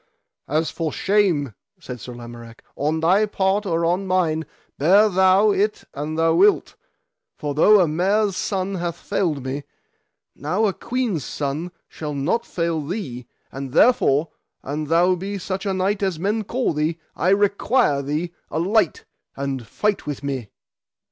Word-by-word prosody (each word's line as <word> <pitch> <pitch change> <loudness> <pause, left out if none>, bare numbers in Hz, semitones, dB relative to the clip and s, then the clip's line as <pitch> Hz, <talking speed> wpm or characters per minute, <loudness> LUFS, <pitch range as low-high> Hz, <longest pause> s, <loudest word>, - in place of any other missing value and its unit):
As 155 +3 0
for 165 -2 -2
the - - -8
shame, 185 - +2 0.3
said 125 -8 -8
Sir 125 - -8
Lamorak, 120 -1 -11
on 155 +3 -1
thy 190 +6 +4
part 200 +1 0
or 165 -1 +1
on 180 +3 0
mine, 165 -4 +1 0.3
bear 195 +9 +6
thou 190 +2 +4
it 210 +2 0
an 150 +2 -4
thou 165 0 +3
wilt, 195 +5 +3 0.6
for 145 -2 -3
though 205 +8 +6
a 180 - +4
mare's 195 +5 +1
son 195 0 -2
hath 175 -2 -3
failed 155 -10 -2
me, 135 +2 -3 0.7
now 180 +10 0
a 200 - +1
queen's 235 - -2
son 145 +7 -3 0.2
shall 150 -2 -6
not 165 +12 -1
fail 165 -2 -1
thee; 140 - -5 0.2
and 135 -1 -6
therefore, 160 - +4 0.3
an 150 +3 -3
thou 170 +4 +3
be 195 +3 -4
such 190 +1 -4
a - - +1
knight 195 +2 0
as 190 -4 0
men 205 +5 -1
call 245 -3 -1
thee, 155 +2 -1 0.2
I 180 - +1
require 200 - +2
thee, 155 +5 -3 0.2
alight, 185 +4 +1 0.3
and 135 -4 -3
fight 210 - -1
with 145 -2 -4
me. 135 -6 -3
170 Hz, 155 wpm, -22 LUFS, 145-195 Hz, 0.7 s, bear